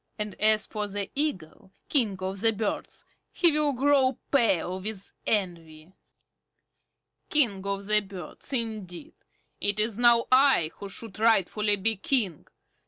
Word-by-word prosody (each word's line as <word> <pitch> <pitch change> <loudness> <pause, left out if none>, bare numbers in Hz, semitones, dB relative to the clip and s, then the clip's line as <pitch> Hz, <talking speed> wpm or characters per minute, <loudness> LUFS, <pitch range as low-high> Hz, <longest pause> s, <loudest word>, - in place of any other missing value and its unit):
And 210 -2 -3
as 215 0 +4
for 210 -1 -4
the 200 -1 -4
Eagle, 190 - -3 0.2
King 225 -9 +2
of 190 +1 -4
the 225 0 +4
Birds, 215 -1 -4 0.3
he 345 -2 +4
will 300 -1 +1
grow 270 -1 +2
pale 190 - +2
with 200 0 -6 0.2
envy. 170 -4 -3 1.4
King 225 -11 +1
of 200 0 -3
the 210 +1 +3
Birds, 190 - -8
indeed! 220 - -4 0.5
It 205 +1 -1
is 215 +1 -1
now 235 -1 +5
I 260 - +4
who 200 - -8
should 210 +1 -7
rightfully 210 -1 +2
be 215 +2 -2
King. 200 - -1
210 Hz, 135 wpm, -26 LUFS, 190-235 Hz, 1.4 s, now